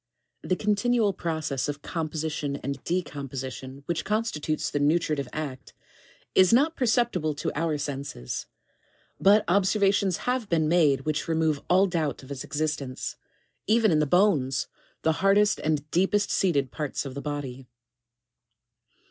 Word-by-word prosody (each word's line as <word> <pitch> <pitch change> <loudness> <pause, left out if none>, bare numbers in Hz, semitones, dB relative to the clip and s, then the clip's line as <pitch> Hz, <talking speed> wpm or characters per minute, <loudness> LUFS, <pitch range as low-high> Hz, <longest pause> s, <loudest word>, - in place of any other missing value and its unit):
9. - - -9
The 185 - +3
continual 210 +2 +1
process 155 -6 -2
of 145 0 -5
composition 155 -3 -3
and 140 0 -5
decomposition 135 -5 -4
which 165 0 -2
constitutes 200 -8 -1
the 145 - 0
nutritive 150 -2 +1
act, 140 -4 -6 0.6
is 185 -1 +5
not 290 +8 +4
perceptible 225 - +1
to 145 - -2
our 160 0 0
senses; 140 - -5 0.7
but 205 +2 +5
observations 195 0 +2
have 250 -3 -1
been 160 -2 +2
made 155 -5 +3
which 155 -1 -2
remove 160 -3 +1
all 185 +2 +5
doubt 160 -7 -2
of 130 - -12
its 135 -2 -5
existence, 145 -4 -3 0.5
even 220 -1 +4
in 155 - +3
the 150 - +2
bones, 140 -8 +2 0.4
the 160 - +3
hardest 205 +1 +4
and 150 -1 -1
deepest 195 +3 +2
seated 140 -9 +1
parts 150 -2 -3
of 135 - -6
the 140 - -5
body. 135 -3 -5
155 Hz, 140 wpm, -26 LUFS, 145-195 Hz, 0.7 s, is